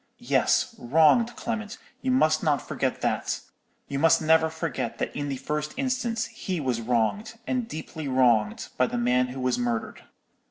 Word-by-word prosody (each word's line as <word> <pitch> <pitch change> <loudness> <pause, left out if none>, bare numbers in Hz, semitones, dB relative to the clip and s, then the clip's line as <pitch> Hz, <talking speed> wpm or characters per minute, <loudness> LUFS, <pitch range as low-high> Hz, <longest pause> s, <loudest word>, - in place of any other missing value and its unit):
—yes, - - +1
wronged, 160 - +4
Clement, 230 -1 -4 0.2
you 265 - -2
must 155 -12 +3
not 150 -3 +2
forget - - -2
that; - - -1 0.5
you 140 - -3
must 165 +1 +5
never 160 0 +4
forget 160 -7 -3
that - - -3
in 145 0 -3
the 135 - -2
first 150 +3 -3
instance 250 -4 -1
he 185 -4 -4
was 125 -5 -1
wronged, 125 - 0
and 250 -3 -1
deeply 155 -2 -6
wronged, 120 -5 +2
by 125 - +3
the 120 - -3
man 125 +1 +2
who 130 +1 -7
was 125 -1 0
murdered. 120 -2 -2
150 Hz, 165 wpm, -26 LUFS, 125-200 Hz, 0.5 s, must